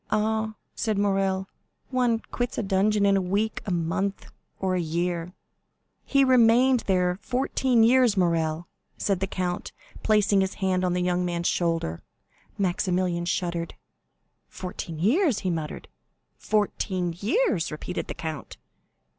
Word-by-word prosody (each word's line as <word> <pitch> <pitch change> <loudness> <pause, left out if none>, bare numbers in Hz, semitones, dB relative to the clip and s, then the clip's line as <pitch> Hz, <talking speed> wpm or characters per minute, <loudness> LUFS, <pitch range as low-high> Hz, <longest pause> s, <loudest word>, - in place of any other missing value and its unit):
"Ah," 220 0 0 0.2
said 215 -3 -1
Morrel, 195 -1 +1 0.4
"one 245 -3 +1
quits 245 0 -2
a - - 0
dungeon 200 +1 +2
in 200 0 +4
a 195 - +2
week, 205 +4 -1
a - - -1
month, 175 +4 -2 0.3
or 190 -1 0
a 180 - +1
year." 170 +2 -2 0.7
"He 275 0 +3
remained 250 0 +5
there 180 -1 +1
fourteen 255 -2 +1
years, 240 -2 +4
Morrel," 165 -2 +1 0.3
said 195 -3 0
the 195 - -1
count, 180 -1 -3 0.3
placing 210 -2 +3
his 190 0 -1
hand 185 -2 0
on 180 -1 +1
the 180 0 0
young 180 0 +1
man's 175 -1 -1
shoulder. 165 - -1 0.6
Maximilian 180 -2 0
shuddered. 170 -1 -2 0.7
"Fourteen 180 -3 -6
years!" 250 - +2
he 185 - -1
muttered. 160 -2 -5 0.5
"Fourteen 190 -4 -1
years!" 225 - +1
repeated 155 +4 -5
the - - -5
count. 155 -5 -6
190 Hz, 135 wpm, -26 LUFS, 175-215 Hz, 0.7 s, remained